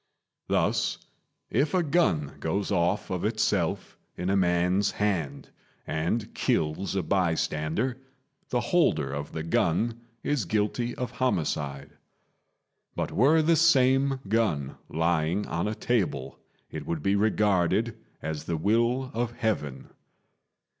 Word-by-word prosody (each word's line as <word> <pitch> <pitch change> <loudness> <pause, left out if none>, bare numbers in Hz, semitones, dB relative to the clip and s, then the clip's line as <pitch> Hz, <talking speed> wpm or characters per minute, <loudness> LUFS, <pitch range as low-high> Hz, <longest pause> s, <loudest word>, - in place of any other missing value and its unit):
Thus, - - +1 0.5
if 145 +5 +1
a 180 - +3
gun 140 - +1
goes 100 +1 -1
off 95 +2 +1
of 90 -2 -2
itself 105 -5 0 0.2
in 90 +2 -1
a - - +2
man's 90 +2 +2
hand 85 -10 -2 0.4
and 85 +8 -2
kills 80 +6 0
a 95 - 0
bystander, 90 +6 0 0.5
the 125 - +1
holder 75 - +3
of 70 +1 -5
the 80 - -4
gun 105 +7 0 0.2
is 145 -8 0
guilty 110 +5 -1
of 125 - -4
homicide; 75 - -2 1.0
but - - -2
were 155 +7 +4
the 165 +2 +4
same 135 -4 +4
gun 95 -11 0
lying 85 +4 +1
on 85 +5 -2
a 110 - -2
table, 95 - -1 0.3
it - - -6
would 80 -3 -3
be 100 +1 +2
regarded 105 +1 +2 0.3
as 80 -1 -4
the 85 -1 -1
will 120 - +1
of 120 0 -1
Heaven. 75 - -2
100 Hz, 125 wpm, -27 LUFS, 80-120 Hz, 1.0 s, were